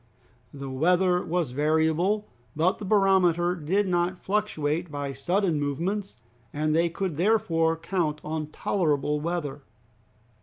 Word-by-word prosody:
The 140 -1 -7
weather 180 +5 +2
was 170 -5 -1
variable, 160 +8 +1 0.3
but 165 +5 +1
the 205 - -6
barometer 185 -4 +3
did 180 +5 0
not 175 0 0
fluctuate 175 -6 -1
by 145 -2 -4
sudden 175 +4 0
movements, 175 +8 -2 0.3
and 155 +1 0
they 170 +1 +3
could 170 -2 -3
therefore 165 -4 +2
count 165 -3 -1
on 155 0 -3
tolerable 150 -3 0
weather. 150 -3 -3
170 Hz, 120 wpm, -26 LUFS, 150-185 Hz, 0.3 s, barometer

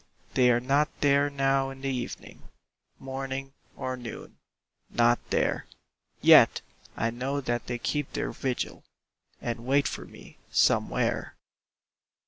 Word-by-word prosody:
They 125 -1 +5
are 120 -1 +4
not 140 +4 +2
there 145 0 +4
now 135 -1 +1
in 135 0 -10
the 135 - -2
evening 120 -1 -7 0.6
Morning 135 0 -5 0.2
or 130 0 -3
noon 120 -2 -9 0.5
not 120 0 +3
there; - - 0 0.6
Yet - - +7 0.4
I 115 +1 0
know 130 +4 -2
that 120 -3 -2
they 120 - -2
keep 145 +3 -2
their - - -2
vigil, 130 -2 -3 0.6
And 115 -1 -4
wait 140 +1 +3
for - - -5
me - - -15
Somewhere. - - +1
135 Hz, 125 wpm, -28 LUFS, 120-135 Hz, 0.6 s, Yet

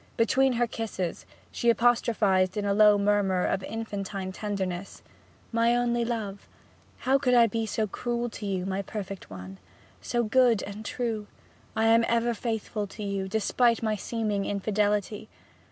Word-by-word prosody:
Between 260 +3 +3
her 240 0 +2
kisses, 215 -7 -4 0.2
she 235 - +1
apostrophized 225 -5 +2
it - - +1
in - - -3
a 200 - +2
low 210 0 +6
murmur 200 -2 +2
of 190 - 0
infantine 200 -3 -4
tenderness: 195 -3 -4 0.5
'My 230 +1 +3
only 240 -1 +1
love 220 -4 -4 0.5
how 265 +2 +2
could 250 -3 +2
I 235 -1 +7
be 225 0 -2
so 215 +1 0
cruel 240 +3 -2
to 210 - -6
you, 185 -2 -2
my 195 0 -1
perfect 195 -2 -7
one 95 0 -9 0.4
so 240 -1 0
good 235 -1 +3
and 205 +2 -7
true 220 -2 -3 0.5
I 220 0 +2
am 230 +1 +5
ever 235 0 +1
faithful 220 -2 -3
to 210 +2 -8
you, 200 -1 -2
despite 230 +4 +2
my 215 -1 +1
seeming 210 -1 -2
infidelity! 210 +1 -1
215 Hz, 155 wpm, -27 LUFS, 200-235 Hz, 0.5 s, I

